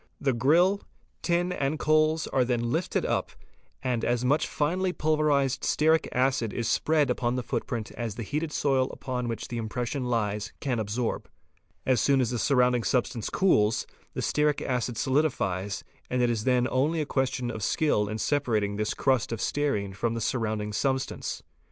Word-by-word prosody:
'The 135 -2 +1
grill, 170 +11 +3 0.4
tin, 175 +1 +1
and 145 -3 -1
coals, 155 +1 +2
are 130 - +1
then 120 -1 -1
lifted 165 +5 0
up - - 0 0.5
and 125 -3 -1
as 120 +1 0
much 145 +5 +2
finely 180 +5 0
pulverized 150 -5 +1
stearic 160 +1 +2
acid 130 -3 +1
is 120 -2 -2
spread 155 +3 +2
upon 120 -1 0
the 125 - -2
footprint 115 -1 -3
as 115 -4 -4
the 115 - -4
heated 150 +6 -2
soil 135 -3 +1
upon 125 -2 -4
which 115 -1 -4
the 120 - -3
impression 125 +4 -3
lies 105 -3 -1
can 125 -4 -1
absorb. 110 +3 -2 0.6
As 130 -4 +3
soon 140 -1 +3
as 125 -2 +1
the 120 - -1
surrounding 125 -3 +3
substance 120 -2 0
cools, 110 - +2 0.3
the - - -2
stearic 150 -1 +2
acid 125 -2 -1
solidifies 105 - 0 0.3
and 125 - 0
it 120 - +3
is 110 -2 -2
then 125 -1 +3
only 150 +6 +1
a 155 - 0
question 130 -3 -1
of 110 -2 -6
skill 105 -2 +1
in 110 - -3
separating 110 -6 0
this 105 0 -1
crust 130 -5 +1
of 115 - -3
stearine 110 -11 -1
from 115 +4 -1
the - - -2
surrounding 110 -3 -1
substance. 130 +4 -2
125 Hz, 170 wpm, -27 LUFS, 115-145 Hz, 0.6 s, grill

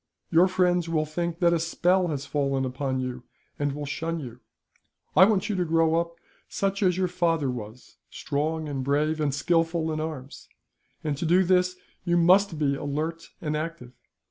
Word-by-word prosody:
Your 170 +2 +6
friends 180 -2 +1
will 155 -2 +1
think 170 +2 -3
that 170 -1 +4
a 170 - +2
spell 175 +3 +2
has 145 -4 -3
fallen 135 -2 0
upon 130 +1 -2
you, 125 -1 -4 0.4
and 145 -1 0
will 145 +1 -5
shun 165 +3 -3
you. 125 -4 -8 0.8
I 190 - +9
want 205 -2 +1
you 210 - -1
to 180 - +1
grow 165 -1 +2
up 170 0 -7 0.3
such 195 +1 -1
as 185 -3 +3
your 185 -1 +1
father 165 -6 0
was 120 0 -9
strong 155 +2 -2
and 135 -3 -3
brave, 150 +3 +1
and 145 -2 +1
skilful 165 +2 +1
in 155 - -2
arms 150 -4 -6 0.5
and 150 -2 -1
to 165 - -3
do 180 +3 +5
this 180 0 +2 0.3
you 175 -1 +2
must 180 +1 +4
be 145 -2 +1
alert 155 +4 -4
and 150 -2 -2
active. 155 -5 -5
160 Hz, 180 wpm, -26 LUFS, 145-175 Hz, 0.8 s, I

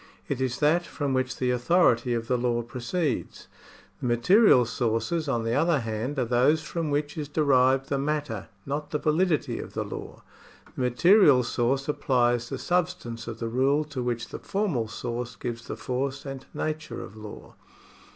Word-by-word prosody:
It 135 -2 -2
is 130 -2 -1
that 160 +4 +4
from 145 -5 -3
which 130 0 -1
the 125 -1 +1
authority 125 -2 +3
of 115 -1 -3
the 125 - +2
law 120 -1 0
proceeds. 125 +5 -3 0.5
The - - -1
material 125 - +5
sources, 125 +8 -1
on 120 -4 0
the 115 +1 -1
other 155 +1 +2
hand, 115 +5 -3
are 130 - +1
those 130 +7 +3
from 165 0 -3
v/hich 145 +2 -1
is 150 - -4
derived 135 -3 +3
the 140 - 0
matter, 145 -6 -2 0.2
not 145 +2 -3
the 150 - -1
validity 155 +2 +1
of - - -8
the - - -1
law. - - -8 0.5
The - - -4
material 140 - +5
source 120 +3 0
supplies 120 -4 +1
the - - -3
substance 175 -11 -2
of 115 -1 -5
the 115 - -3
rule 135 +6 +2
to 130 - -2
which 120 -2 -2
the - - -7
formal 180 - -1
source 120 +1 -5
gives 120 0 -6
the - - -5
force 135 +2 -3
and 135 -1 -7
nature 155 0 -4
of 95 - -11
law. 105 -1 -10
130 Hz, 175 wpm, -26 LUFS, 120-150 Hz, 0.5 s, material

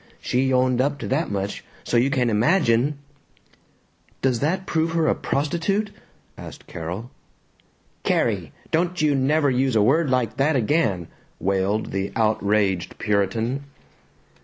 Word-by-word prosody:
She 130 +1 0
owned 130 -1 +3
up 145 +2 0
to - - -6
that 150 +6 0
much, 100 0 -3 0.2
so - - -2
you 120 +3 +4
can 125 -4 +1
imagine 125 - +2 0.6
" - - -38
"Does 130 -3 +2
that 185 +6 -1
prove 160 -1 0
her 165 -1 +2
a - - +4
prostitute?" 170 +9 -1 0.5
asked - - -10
Carol. 90 +9 -6 0.9
"Carrie! - - 0 0.2
Don't 175 +2 0
you 150 -1 +3
never 140 +2 +2
use 130 -1 +1
a 105 - +4
word 145 +6 +3
like 125 -3 0
that 145 +2 +2
again!" 115 - +1 0.3
wailed 100 +3 0
the 95 0 -2
outraged 105 -4 +1
Puritan. 110 +6 0
130 Hz, 135 wpm, -23 LUFS, 105-150 Hz, 0.9 s, you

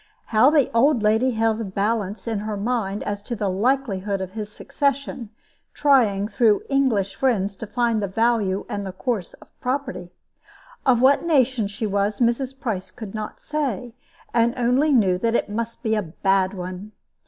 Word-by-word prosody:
How 225 +4 +5
the 295 -4 +3
old 235 0 +3
lady 220 +4 +3
held 225 -1 0
a - - -1
balance 205 +1 -2
in 225 -3 -1
her 210 0 -4
mind 205 -2 -2
as 205 0 -3
to 235 +3 -5
the 205 -2 -1
likelihood 205 -3 0
of 190 -1 -5
his 210 0 -6
succession, 275 -3 -2 0.5
trying, 225 -9 +3
through 215 0 +2
English 235 -9 +1
friends, 200 -4 0
to 225 - -7
find 230 0 0
the 200 - -1
value 210 -2 +1
and 205 -1 -4
the 190 -1 -6
course 210 -3 -3
of - - -21
property. 250 -9 -3 0.8
Of 245 -2 +4
what 275 +4 +5
nation 260 -9 +2
she 205 +3 -4
was, 200 0 0
Mrs. 255 +2 0
Price 215 -9 -3
could 220 -5 -9
not 215 -1 -6
say, 255 -7 -3 0.4
and 235 +1 +2
only 250 +5 +2
knew 195 -9 +3
that 230 +3 +1
it - - 0
must 230 +2 -4
be 220 - +1
a 215 - +2
bad 190 +2 0
one. 185 +3 -7
220 Hz, 175 wpm, -23 LUFS, 200-250 Hz, 0.8 s, How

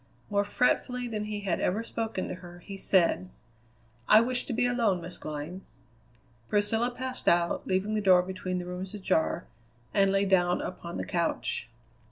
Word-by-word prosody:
More 200 0 +3
fretfully 250 +3 +1
than 215 -2 -3
he 210 -1 -4
had 200 -2 -1
ever 210 +5 0
spoken 225 -5 -3
to - - -4
her, 175 -1 -11
he 200 - -6
said: 170 - +2 0.8
"I 215 - +9
wish 245 +2 +1
to - - -5
be 240 - +2
alone, 235 -7 +2
Miss 175 +1 -6
Glynn." 155 +5 -5 0.9
Priscilla 220 +3 +2
passed 255 +1 -6
out, 170 0 +2
leaving 190 +3 0
the 215 - +1
door 185 -3 +6
between 185 0 -3
the 180 - -4
rooms 185 +3 -6
ajar, 185 -5 0 0.5
and 195 -1 +4
lay 195 0 +2
down 180 -2 +3
upon 175 -1 -5
the - - -3
couch. 170 -8 -1
195 Hz, 170 wpm, -29 LUFS, 180-215 Hz, 0.9 s, I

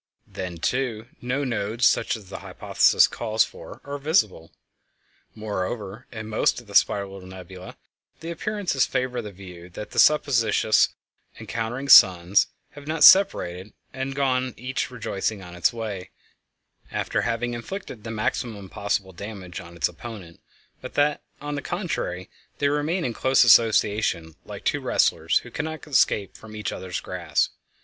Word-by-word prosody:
Then, 90 -2 -6
too, 120 +3 -2
no 130 +4 -1
nodes 115 -1 -1
such 115 - +2
as 105 -3 -15
the 95 - -7
hypothesis - - +3
calls 110 +1 +1
for - - -11
are 145 0 -6
visible. 140 - +1 0.8
Moreover, 105 +1 -4
in 110 -2 -7
most 110 +2 +1
of 120 - -15
the 100 - -13
spiral 100 -1 +2
nebulæ 95 0 -10 0.4
the 165 +1 -6
appearances 195 -6 -1
favor 125 -1 -1
the 105 - -8
view 90 -2 -12
that 105 +4 -8
the - - -1
supposititious 125 -7 +4 0.5
encountering 120 +4 -4
suns 90 -3 +7 0.2
have 145 0 -12
not 155 0 0
separated 100 - +5 0.2
and 135 +1 -4
gone 130 -3 0
each 125 +3 -3
rejoicing 110 -4 -3
on 90 -1 -10
its 90 -2 +2
way, 110 -5 -5 0.8
after - - -1
having 120 +1 -1
inflicted 120 - -7
the 110 - -6
maximum 105 -2 -3
possible 100 -1 -2
damage 95 -1 -8
on 85 -2 -11
its 85 - +1
opponent, 100 -8 -10 0.4
but - - -9
that, 145 0 +2 0.2
on 145 +1 -5
the 145 - -3
contrary, 160 - -3 0.3
they 145 - +2
remain 150 +5 0
in 120 - -2
close 130 +3 +4
association 105 -7 +3
like - - -9
two - - +1
wrestlers - - +2
who - - -12
cannot 160 +1 -5
escape 120 -8 +2
from 110 -1 -12
each 105 -2 -3
other's 90 -2 -5
grasp. - - -1
110 Hz, 150 wpm, -24 LUFS, 95-135 Hz, 0.8 s, suns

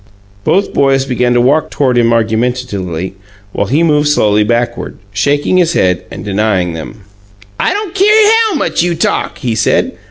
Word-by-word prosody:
Both 195 - 0
boys 135 -1 +2
began 125 -2 0
to - - +4
walk 145 +5 +2
toward 130 -3 0
him 120 -1 +3
argumentatively, 110 -6 -2 0.4
while 100 - -2
he 145 +9 +1
moved 150 -2 +2
slowly 105 -7 +2
backward, 120 +2 -2 0.2
shaking 145 - +1
his 170 -2 +2
head 90 - 0
and - - -9
denying 100 -4 0
them. 80 +7 -8 0.6
"I - - +1
don't 410 -3 -4
keer 405 +2 +3 0.3
how 395 - -2
much 290 - 0
you 175 0 0
talk!" - - -1
he 120 -5 -2
said. 110 - +1
125 Hz, 165 wpm, -13 LUFS, 105-150 Hz, 0.6 s, to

